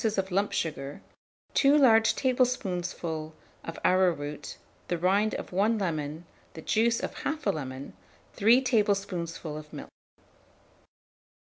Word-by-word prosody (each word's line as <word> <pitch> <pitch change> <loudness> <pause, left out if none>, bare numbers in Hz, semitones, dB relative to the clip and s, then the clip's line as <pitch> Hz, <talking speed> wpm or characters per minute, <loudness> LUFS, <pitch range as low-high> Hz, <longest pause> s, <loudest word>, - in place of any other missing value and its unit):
of 190 0 -1
lump 200 +3 +1
sugar, 145 -3 -3 0.5
2 280 +1 +5
large 225 -6 +5
tablespoonfuls 180 - -1 0.3
of 165 - -7
arrowroot, 155 -6 +1 0.3
the 175 - -1
rind 195 +5 +2
of - - -6
1 210 +5 +2
lemon, 160 -4 -3 0.3
the 160 - -7
juice 230 +1 +2
of - - -4
1/2 285 -9 -1
lemon, 135 -2 -6 0.4
3 235 +6 +4
tablespoonfuls 195 - -1
of - - -27
milk. - - -8
185 Hz, 115 wpm, -28 LUFS, 160-225 Hz, 0.5 s, 2